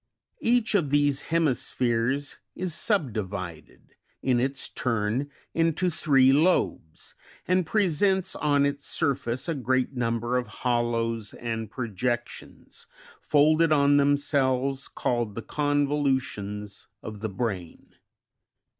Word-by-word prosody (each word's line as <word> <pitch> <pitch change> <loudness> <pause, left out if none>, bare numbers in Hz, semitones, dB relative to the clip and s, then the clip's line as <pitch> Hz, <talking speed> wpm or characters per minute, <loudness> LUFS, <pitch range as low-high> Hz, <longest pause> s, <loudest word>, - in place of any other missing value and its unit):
Each 235 -2 +2
of 175 -9 +2
these 145 -1 +2
hemispheres 135 -4 0 0.2
is 180 -2 -2
subdivided, 100 - -3 0.3
in 125 -2 +2
its 135 +2 -1
turn, 115 +3 -1 0.2
into 165 +2 +1
three 135 -4 +4
lobes, 120 - 0 0.3
and 185 -2 +2
presents 190 0 +1
on 145 -1 +2
its 140 0 -3
surface 130 -5 -1
a 165 - 0
great 130 0 0
number 120 0 0
of 125 -2 -2 0.2
hollows 115 -3 0
and 115 -2 -4
projec 120 0 -2
tions, - - -12 0.3
folded 155 +2 +3
on 145 -1 +4
themselves, 140 -2 +1
called 120 -4 -2
the 115 - -5
convolutions 135 -9 -1 0.2
of 105 -1 -7
the 110 +1 -3
brain. 95 -5 -5
135 Hz, 110 wpm, -26 LUFS, 115-150 Hz, 0.3 s, three